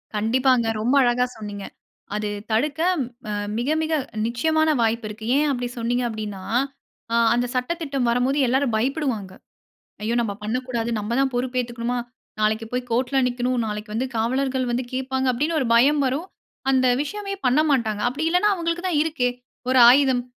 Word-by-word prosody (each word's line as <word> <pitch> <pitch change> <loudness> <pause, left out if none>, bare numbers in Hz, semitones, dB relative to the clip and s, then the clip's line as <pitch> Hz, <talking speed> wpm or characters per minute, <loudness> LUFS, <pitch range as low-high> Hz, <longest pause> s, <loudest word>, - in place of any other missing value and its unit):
கண்டிப்பாங்க. 245 +3 +2 0.2
ரொம்ப 245 +5 +2
அழகா 245 0 +2
சொன்னீங்க. 205 -2 -7 0.5
அது 210 0 -2 0.2
தடுக்க 280 +7 0 0.5
அ - - -2 0.2
மிக 240 +4 -1
மிக 320 0 -1 0.3
நிச்சயமான 315 +7 +1
வாய்ப்பு 230 0 +1
இருக்கு. 215 +1 -8
ஏன் 300 +2 +3
அப்பிடி 245 -2 -2
சொன்னீங்க 240 +2 0
அப்பிடின்னா, 210 -4 -5 0.7
ஆ - - +3 0.2
அந்த 245 +1 +1
சட்ட 250 +6 0
திட்டம் 275 -5 -1
வரும்போது 250 +4 +1
எல்லாரும் 260 0 +1
பயப்படுவாங்க. 240 -6 -1 0.7
"ஐயோ! 230 +2 0
நம்ம 215 -3 -2
பண்ணக்கூடாது. 235 +1 -2
நம்மதான் 240 +6 0
பொறுப்பு 250 +1 -2
ஏத்துக்கணுமா! 240 0 -3 0.4
நாளைக்கு 215 +1 +1
போய் 250 0 -1
கோர்ட்‌ல் 255 +2 +2
நிக்கணும். 245 0 -1
நாளைக்கு 210 0 -5
வந்து 245 +4 -1
காவலர்கள் 260 +3 0
வந்து 245 +1 -1
கேப்பாங்க," 265 0 -1
அப்பிடின்னு 300 +7 0
ஒரு 255 - 0
பயம் 285 +5 +4
வரும். 275 +7 -1 0.4
அந்த 260 -1 +3 0.2
விஷயமே 395 +6 -5
பண்ண 255 +4 +4
மாட்டாங்க. 220 -6 0
அப்பிடி 285 +6 -2
இல்லன்னா, 360 +5 +3
அவுங்களுக்கு 340 0 -2
தான் 330 -5 +1
இருக்கே! 305 -6 0 0.4
ஒரு 260 0 +4
ஆயுதம் 260 -1 +4
250 Hz, 155 wpm, -23 LUFS, 230-275 Hz, 0.7 s, பயம்